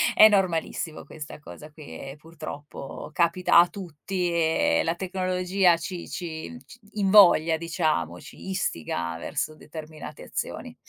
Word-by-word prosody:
È 215 - +10
normalissimo 175 -5 0
questa 150 -1 -9
cosa 150 - -12
qui - - -13
e 135 +1 -8
purtroppo 150 -2 -9
capita 170 0 +3
a 175 +1 +8
tutti 180 0 -4
e 160 -1 +2
la 165 +1 0
tecnologia 185 -1 +1
ci 175 +1 -6
ci 170 +7 -6
ci 235 +2 -15 0.2
invoglia 180 -5 +6
diciamo, 155 - -1
ci 190 - -11
istiga 85 - -2
verso 155 - -3
determinate 155 0 -9
azioni. - - -5
165 Hz, 125 wpm, -26 LUFS, 155-185 Hz, 0.2 s, È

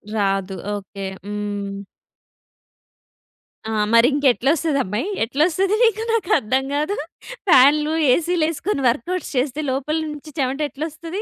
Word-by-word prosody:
రాదు. 195 -2 0 0.2
ఓకె. 195 0 -7 0.2
హ్మ్. 205 -1 -4 1.9
ఆ! - - -2 0.2
మరింకెట్లొస్తదమ్మాయి? 275 - +2 0.2
ఎట్లొస్తది 335 - +1
మీకు 450 -1 +2
నాకర్థం 265 - +1
గాదు. 305 +8 -1 0.5
ఫ్యాన్లు, 300 +3 +5 0.2
ఏసీ‌‌లేసుకొని 335 0 0
వర్క్ 295 +9 -2
ఔట్స్ - - -8
చేస్తే 280 +3 0
లోపల 280 +4 -1
నుంచి 300 0 -9
చెమట 265 +1 -1
ఎట్లొస్తది? 325 +6 -6
280 Hz, 95 wpm, -21 LUFS, 230-320 Hz, 1.9 s, ఫ్యాన్లు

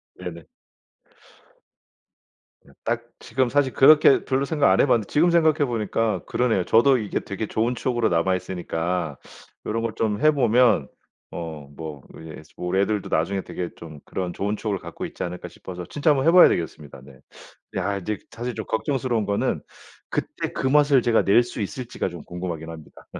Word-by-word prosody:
네네. 85 -3 -8 2.2
네. - - -20
딱 120 +1 -1 0.2
지금 125 +1 -1
사실 130 -3 0
그렇게 145 0 +6
별로 135 +1 0
생각 145 -2 +2
안 - - +3
해 - - +5
봤는데 115 -6 +2
지금 165 +4 +4
생각해 160 -3 +3
보니까 110 -5 -1
그러네요. 115 -7 +1
저도 125 +4 +5
이게 105 -3 -2
되게 100 +2 -5
좋은 115 +3 0
추억으로 120 -2 0
남아 90 +2 +2
있으니까 85 -3 -3 0.5
'요런 115 +1 -2
걸 115 -2 -2
좀 110 +1 -1
해 155 0 +6
보면 125 -3 +3 0.4
어 80 -4 -7
뭐 75 -2 -7 0.2
이제 80 -1 -9
우리 90 +2 -1
애들도 105 0 -1
나중에 95 +5 0
되게 90 -1 -5
좀 75 -3 -11
그런 90 -2 -4
좋은 105 +2 -2
추억을 105 -3 -2
갖고 - - -7
있지 - - -6
않을까?' 90 0 -5
싶어서 90 -1 -9
진짜 150 +1 0
한번 135 +1 +1
해 165 - +7
봐야 180 0 +9
되겠습니다. 75 -5 -4
네. 65 -2 -16 0.6
야 100 -1 -1
이제 105 +3 -3
사실 120 0 -5
좀 110 - -5
걱정스러운 120 -1 -1
거는 100 0 -1 0.5
그때 - - -3
그 - - -1
맛을 145 -1 +4
제가 115 -1 +3
낼 105 +5 +5
수 120 -2 -6
있을지가 115 -1 -4
좀 85 -3 -9
궁금하긴 85 -2 -5
합니다. 80 -2 -12
110 Hz, 350 characters per minute, -24 LUFS, 90-125 Hz, 2.2 s, 봐야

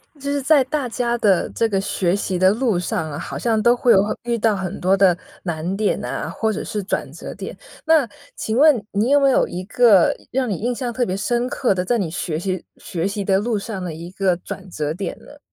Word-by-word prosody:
就 280 - -21
是 285 0 0
在 280 0 +5
大 280 -1 -2
家 240 0 -1
的 200 -6 +2
这 230 - +1
个 195 -2 +1
学 190 -1 0
习 190 -2 -2
的 185 +1 +6
路 225 -4 +1
上 175 -4 -2
啊， 145 - -5
好 - - -6
像 225 -2 +1
都 240 +2 +5
会 240 -1 +3
有 195 - +6
很 210 - -2
遇 235 0 -1
到 220 -1 +2
很 190 0 -4
多 185 +2 +3
的 190 -3 +5 0.3
难 170 +2 -3
点 210 -1 +1
呐， - - -4
或 220 -1 -1
者 - - -4
是 210 - -3
转 190 - -2
折 - - -8
点。 - - -7 0.3
那 315 -5 +4 0.3
请 220 +1 -2
问 300 +1 +7 0.2
你 225 +8 +2
没 280 -1 +5
有 265 - +3
一 180 +1 -5
个 215 -4 +5
一 - - -23
让 255 -1 0
你 200 - 0
印 240 +6 -1
象 245 0 -3
特 245 +1 0
别 185 - -2
深 240 +5 0
刻 255 -4 +1
的， 180 0 -1
在 240 +6 +1
你 190 -7 -1
学 160 -1 -3
习 185 0 -3
学 170 +1 -3
习 200 0 -3
的 195 0 +2
路 225 +1 -1
上 200 -2 -5
的 175 -3 -4
一 165 +2 -8
个 190 -1 +1
转 190 +2 -8
折 150 -3 -2
点 180 +1 -5
呢？ 290 - -15
205 Hz, 265 characters per minute, -21 LUFS, 185-240 Hz, 0.3 s, 问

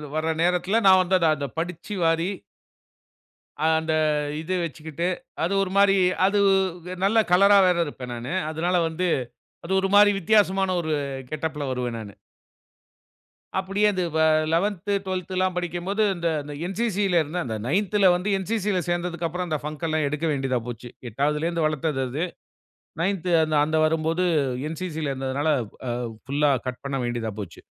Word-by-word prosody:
வர 160 +1 0
நேரத்தில, 180 +5 +2
நான் 190 -1 +8
வந்து 185 +1 +1 0.2
அத 145 -2 -3
படிச்சு 175 +4 -5
வாரி 165 +2 +2 1.4
அந்த 160 0 +2 0.5
இது 170 +4 -3
வச்சுகிட்டு 160 +1 -4 0.4
அது 175 +4 0
ஒரு 185 - -4
மாரி 200 0 +5 0.3
அது 205 +1 +2 0.7
நல்ல 215 +3 +2
கலர்‌ரா 200 +3 +6
வேற 180 -1 +3
இருப்பேன் 125 -4 -7
நானு. 120 +7 -5 0.2
அதனால 170 +3 -1
வந்து 170 +3 -2 0.6
அது 175 - -5
ஒரு 195 - +1
மாரி 205 0 +8
வித்தியாசமான 195 -1 +2
ஒரு 160 -2 -2 0.4
கெட்டப்‌ல 155 -1 -3
வருவேன் 125 -2 -3
நானு. 105 -2 -9 1.5
அப்டியே 195 +2 +1
அது 185 -1 -1
வ - - +2 0.3
லெவந்த், 200 +3 0 0.2
ட்வெல்த் 185 -1 -4
லாம் 185 -1 0
படிக்கும்போது 180 +4 -1
இந்த 170 -1 -1 0.4
என்சிசில 195 -3 +1
இருந்தேன் 165 +3 -3
அந்த 110 -2 -3
நைந்த்ல 195 +4 +3
வந்து 180 +3 -2
என்சிசி 205 +1 -1
ல - - +2
சேர்ந்தததுக்கு 175 -1 -1
அப்புறம் 180 +2 -4
அந்த 155 -2 -1
பங்க 155 +2 -4
எல்லாம் 155 -1 0
எடுக்க 150 +3 -2
வேண்டியதா 135 -3 0
போச்சு. 120 0 -7 0.2
எட்டாவதுலருந்து 150 +7 0
வளர்த்தது 155 -2 -2
அது. 145 +7 -2 0.8
நைந்த் 185 -1 -1
அந்த 155 0 -1
அந்த 155 +1 0
வரும்போது 160 +2 0 0.5
என்சிசி 160 -1 -5
ல 140 - -1
இருந்ததனால, 135 +3 -2 0.6
அ - - -5 0.2
புல்‌லா 145 +1 +2 0.2
கட் 125 - -6
பண்ண 135 0 -2
வேண்டியதா 120 -2 -3
போச்சு. 90 -5 -9
165 Hz, 145 wpm, -24 LUFS, 150-185 Hz, 1.5 s, நான்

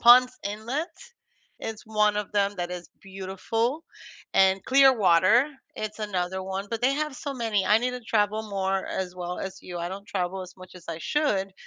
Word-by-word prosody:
Ponce 250 +1 +7
Inlet, 240 - -3 0.7
is 220 -1 -5
one 210 -1 +2
of 210 0 -3
them 200 0 +2
that 175 -1 -3
is 175 -1 -7
beautiful, 195 - -2 0.5
and 190 0 +4
Clearwater, 240 - +5 0.3
it's 215 0 -4
another 190 -2 -2
one, 190 +1 -4
but 230 -1 -2
they 265 +2 +4
have 300 -1 -2
so 280 +1 -4
many. 225 -6 0
I 210 +1 +6
need 250 +2 0
to 250 - -5
travel 215 -1 +1
more, 195 -1 -1
as 185 -1 -3
well 180 0 -4
as 190 0 -5
you, 175 -1 -6
I 170 +1 -2
don't 200 +2 -7
travel 190 0 -2
as 185 0 -11
much 185 0 -13
as 175 - -14
I 165 - -4
should, 195 - 0
205 Hz, 185 wpm, -26 LUFS, 190-235 Hz, 0.7 s, Ponce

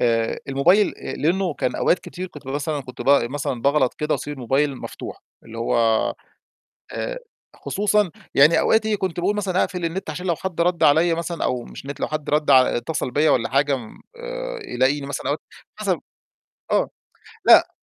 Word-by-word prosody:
آآ، 115 -1 +1
الموبايل 175 +10 +4 0.3
لأنه 175 +1 0
كان 125 - -2
أوقات 180 - +2
كتير 185 +1 -7
كنت 145 -5 -13
مثلًا 145 +2 -2
كنت 130 -1 -8
ب 125 - -3
مثلًا 130 -2 +1
باغلط 140 -2 +2
كده 150 0 -1
وأسيب 145 - -5
الموبايل 135 +2 0
مفتوح، - - -8 0.2
اللي 115 0 -9
هو 115 - -1 1.2
آآ، - - -3 0.4
خصوصًا 210 -2 +1 0.2
يعني 150 +4 +6
أوقات 220 0 +3
إيه، 215 -1 +1
كنت 185 -3 -3
باقول 200 +4 +1
مثلًا 190 -3 +1
أقفل 180 -3 -5
النت، 165 0 -3
عشان 180 +5 -6
لو 170 - +1
حد 180 -2 -4
رد 175 0 +1
عليّا 160 +3 +5
مثلًا، 170 0 -3
أو 125 -2 -1
مش - - -11
نت، 140 0 -7
لو - - -1
حد 155 -1 -3
رد 150 0 +2
ع 130 -3 +6
اتصل 125 +1 -2
بيّا 150 +4 +3
والّا 115 - +2
حاجة، 140 +1 +2 0.4
آآ - - -6
يلاقيني 135 +3 0
مثلًا 140 - -5
أوقات - - -1 0.4
مثلًا - - 0 0.7
آه، - - +2 0.5
لأ - - +7
150 Hz, 175 wpm, -22 LUFS, 135-180 Hz, 1.2 s, لأ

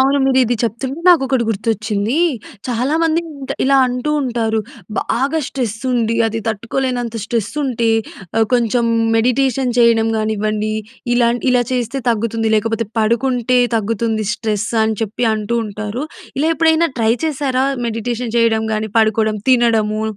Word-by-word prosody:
అవును. 275 +2 +3
మీరు 265 -1 +3
ఇది 240 +1 0
చెప్తుంటే 255 +6 -3
నాకు 340 -6 +6
ఒకటి 260 -3 +1
గుర్తొచ్చింది. 215 +2 -1 0.5
చాలామంది 315 +7 +1
ఎంట 280 -4 -9
ఇలా 275 +1 +4
అంటూ 250 +4 -2
ఉంటారు. 230 -3 -1 0.4
బాగా 275 +7 0
స్ట్రెస్ 240 -6 -3
ఉండి, 230 -2 +1
అది 225 0 -2
తట్టుకోలేనంత 240 +2 -2
స్ట్రెస్ 225 -3 -2
ఉంటే 235 -3 0 0.5
ఆహ్, 225 - +3
కొంచెం 240 -1 +2 0.3
మెడిటేషన్ 250 +2 +1
చేయడం 230 -1 +4
కానివ్వండి, 215 0 -1 0.4
ఇలా 240 -1 +3 0.2
ఇలా 250 -1 +3
చేస్తే 250 +2 -1
తగ్గుతుంది, 225 0 -1
లేకపోతే 225 +1 -1
పడుకుంటే 245 +2 +1 0.2
తగ్గుతుంది. 220 0 -1
స్ట్రెస్ 215 -1 -2 0.2
అని 220 -1 -1
చెప్పి 225 +3 -1
అంటూ 215 +2 -2
ఉంటారు. 215 +5 -5 0.3
ఇలా 310 +3 +2
ఎప్పుడైనా 325 0 +3
ట్రై 225 0 +3
చేశారా 270 -4 0 0.2
మెడిటేషన్ 230 +1 -3
చేయడం, 225 -1 +2
గాని 215 0 -3
పడుకోవడం, 220 0 +1
తినడము, 225 -4 +3
230 Hz, 135 wpm, -17 LUFS, 220-255 Hz, 0.5 s, నాకు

